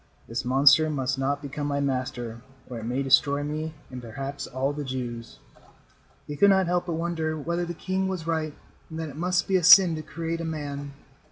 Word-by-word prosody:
"This 115 +2 -3
monster 140 +5 +5
must 135 -2 -1
not 140 +2 -1
become 145 +1 -4
my 140 -1 -1
master, 125 -4 -3 0.3
or 125 -2 -6
it 110 - -7
may 125 +4 -1
destroy 140 +2 +3
me 155 +2 -4 0.2
and 125 -1 -7
perhaps 135 +5 -6
all 135 +2 -2
the 145 0 -4
Jews." 120 -3 -6 0.9
He 145 - -6
could 200 +7 +5
not 190 -1 +4
help 175 +1 0
but 170 - -2
wonder 160 -1 -2
whether 170 +3 -2
the 175 0 -6
king 190 +3 -2
was 185 -4 -4
right 160 -2 -2 0.3
and 160 - -7
that 160 -1 -4
it 140 - -11
must 175 +2 0
be 190 - +3
a 180 - -2
sin 180 0 +9
to 155 - -4
create 165 +1 -4
a - - -4
man. 145 -3 -5
145 Hz, 205 wpm, -26 LUFS, 135-165 Hz, 0.9 s, sin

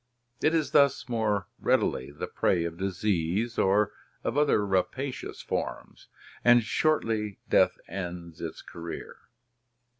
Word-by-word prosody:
It 160 - +3
is 155 -3 +1
thus 140 -2 +4
more 110 -4 0
readily 65 - +1
the 70 - -5
prey 85 -2 +1
of 85 -1 -4
disease 95 +3 -1
or 105 +2 +3 0.3
of 115 - -1
other 145 -7 +4
rapa 105 +8 0
cious - - -7
forms, - - -4 0.4
and 120 -1 +6
shortly 110 - 0
death - - +4
ends 85 -2 -6
its - - -6
career. 85 0 -8
105 Hz, 125 wpm, -28 LUFS, 90-120 Hz, 0.4 s, and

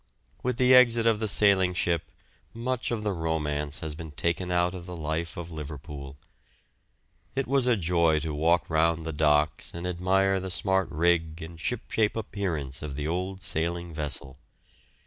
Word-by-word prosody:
With 125 -1 -1
the 130 -1 +5
exit 120 -2 +6
of 115 -2 +3
the 110 - -1
sailing 95 -3 +4
ship 85 -1 0 0.5
much 125 +2 -2
of 115 -3 -2
the 105 - 0
romance 75 -3 -2
has 80 -1 -3
been 80 +1 -8
taken 85 +4 -2
out 90 0 +2
of 90 -1 -8
the 90 -1 -6
life 80 +3 -3
of 85 0 -6
Liverpool. 75 -2 -8 1.2
It 135 0 0
was 135 -1 +3
a 120 -2 +4
joy 85 -3 +2
to 80 -1 -3
walk 80 +3 +2
round 80 0 +1
the 80 - -3
docks 75 +1 +1
and 85 +1 -5
admire 95 +2 +2
the 95 0 -5
smart 95 +2 0
rig 80 0 +1
and 80 0 -10
shipshape 110 -1 -1
appearance 90 -11 -3
of 75 -2 -5
the 75 +1 -3
old 90 +3 -3
sailing 85 +1 -1
vessel. 70 -3 -1
85 Hz, 165 wpm, -27 LUFS, 80-95 Hz, 1.2 s, exit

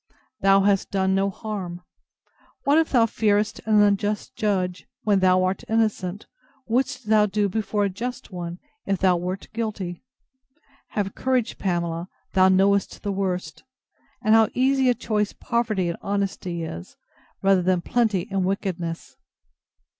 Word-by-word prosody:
Thou 195 0 +5
hast 195 -1 +2
done 190 -1 +1
no 195 +1 +2
harm! 190 -4 -6 0.8
What, 290 +2 +4
if 325 - +1
thou 240 -4 +4
fearest 210 -1 +1
an 210 -1 +5
unjust 205 +1 0
judge, 185 -5 -1 0.2
when 205 -2 +3
thou 185 0 +4
art 185 +1 -1
innocent, 210 -4 0 0.4
would'st 245 +1 0
thou 215 -1 +4
do 205 0 +1
before 210 +1 -1
a - - 0
just 240 +6 -6
one, 175 -1 -5 0.3
if 195 -1 +1
thou 185 -1 +3
wert 180 +2 -4
guilty? 210 -6 -4 0.9
Have 200 -2 -1
courage, 255 -3 -1
Pamela, 170 -1 -2 0.2
thou 185 0 +5
knowest 195 +1 +2
the 205 - -1
worst! 190 -2 -3 0.6
And 215 -1 +4
how 225 -1 +6
easy 265 0 +3
a 245 - +3
choice 210 -2 -1
poverty 220 -6 -1
and 170 - -3
honesty 190 -4 -2
is, 85 - -8 0.5
rather 195 -1 +4
than 180 0 +1
plenty 215 -3 0
and 195 -1 0
wickedness. 180 -3 -3
195 Hz, 145 wpm, -24 LUFS, 185-215 Hz, 0.9 s, how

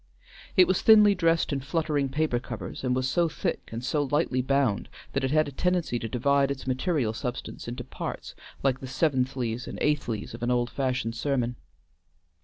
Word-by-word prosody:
It 185 - +7
was 185 - +1
thinly 210 -2 +7
dressed 165 -4 +2
in 140 - 0
fluttering 145 -1 -1
paper 145 -3 0
covers, 110 -5 -7
and 125 -1 +1
was 130 0 0
so 170 +4 +2
thick - - -3
and 115 +2 -5
so 150 +3 +1
lightly 145 -3 +1
bound 130 -5 +1 0.2
that 135 - 0
it 130 - +1
had 155 +2 +3
a - - -5
tendency 175 -4 0
to 115 - -4
divide 140 +4 +2
its 140 -1 -4
material 130 -2 0
substance 120 +1 -5
into 120 +1 -5
parts, - - -6 0.3
like 135 -1 +2
the 130 - -7
seventhlies 130 -4 0
and - - -6
eighthlies 140 -8 -1
of - - -8
an 120 - 0
old 120 -1 +1
fashioned 125 -4 -1
sermon. 125 -1 -1
135 Hz, 185 wpm, -27 LUFS, 125-150 Hz, 0.3 s, It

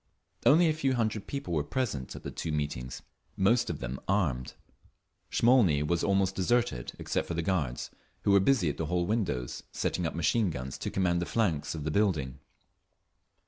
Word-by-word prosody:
Only 165 +4 +6
a 155 - +3
few 135 -4 0
hundred 110 -3 -1
people 140 -9 -4
were 75 -3 +1
present 75 - -3
at - - -9
the - - -5
two 80 - -4
meetings, 70 -5 -3 0.3
most 115 +5 +3
of 85 - -4
them 65 +2 -4
armed. 80 -11 0 0.7
Smolny 115 - +4
was 85 +3 0
almost 95 -1 +2
deserted, 95 - 0
except - - -2
for 85 - -3
the 85 - -1
guards, 75 -9 -1 0.3
who - - +3
were 100 - +7
busy 105 - +3
at 75 - -1
the 80 - -2
hall 90 +1 0
windows, 85 - -1
setting 90 -2 -1
up - - -5
machine 100 +5 +2
guns 65 -4 -5
to - - -3
command 90 -2 +1
the 85 - -2
flanks 85 -10 0
of 75 - -5
the 80 - -1
building. 75 -9 0
85 Hz, 185 wpm, -29 LUFS, 75-110 Hz, 0.7 s, were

